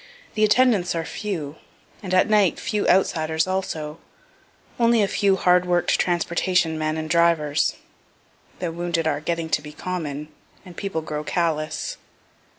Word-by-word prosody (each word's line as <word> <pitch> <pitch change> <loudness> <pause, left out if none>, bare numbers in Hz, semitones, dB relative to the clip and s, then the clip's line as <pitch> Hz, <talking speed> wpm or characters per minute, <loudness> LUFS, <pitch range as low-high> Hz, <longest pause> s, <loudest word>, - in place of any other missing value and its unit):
The 215 - +1
attendants 215 -5 +3
are 165 -1 -2
few, 160 -9 -5 0.4
and 190 - -6
at 185 +3 +4
night 210 -4 +3
few 210 -1 -1
outsiders 160 -4 +2
also 165 -5 -3 0.8
only 230 -2 +4
a - - +2
few 195 -1 +2
hard 180 -1 +3
work'd 175 -1 +2
transportation 175 -1 +1
men 155 0 -1
and 155 0 -3
drivers. 160 -3 +2 0.8
(The 175 -2 -3
wounded 170 -1 -2
are 150 -2 0
getting 165 0 -2
to 150 - +1
be 150 0 -10
common, 150 -4 -5 0.4
and 180 -2 -12
people 195 -4 -3
grow 150 -1 -4
callous.) 155 -2 -2
170 Hz, 145 wpm, -23 LUFS, 155-185 Hz, 0.8 s, at